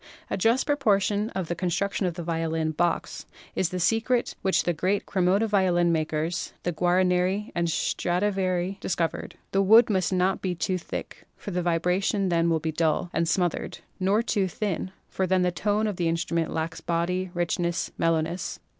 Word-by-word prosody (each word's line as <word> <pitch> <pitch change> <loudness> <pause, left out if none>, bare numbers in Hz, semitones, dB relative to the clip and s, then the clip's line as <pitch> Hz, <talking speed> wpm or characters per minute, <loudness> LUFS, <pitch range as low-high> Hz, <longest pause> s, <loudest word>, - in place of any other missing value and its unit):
A - - +1
just 230 +7 +2
proportion 210 -7 +1
in 190 - 0
the 175 - -3
construction 185 +3 -1
of 170 - -3
the 175 - -5
violin 160 -1 -1
"box" 170 +2 -1 0.3
is 185 - 0
the 180 - -3
secret 225 +6 +1
which 190 - +2
the 175 - +1
great 185 +5 0
Cremona 190 +3 +2
violin 185 -5 +2
makers 160 +1 -1
— - - -44
the 175 - -1
Guar 180 +3 +2
nerii 185 +4 0
and 170 0 0
Stradivarii 185 +2 0
— - - -35
discovered. 170 -2 -2 0.2
The 195 - +2
wood 220 +4 +6
must 190 -1 +1
not 185 +1 +1
be 185 -2 -1
too 185 +2 -1
thick, - - -7
for 205 - -7
the 180 0 -1
vibration 180 +3 +1
then 170 -1 +2
will 165 -1 +2
be 160 +1 -2
dull 160 +2 0
and 165 - +1
smoth 175 -1 +2
ered, - - -7 0.2
nor 200 +4 +2
too 200 -5 +1
thin, 185 0 -3 0.2
for 190 - -1
then 185 0 +2
the 180 - +2
tone 210 +4 0
of 210 -4 -2
the 175 - 0
instrument 165 0 0
lacks 165 0 -3
body, 180 +3 -1
richness, 175 0 -1
mellowness. 165 +1 0
180 Hz, 185 wpm, -26 LUFS, 170-195 Hz, 0.3 s, wood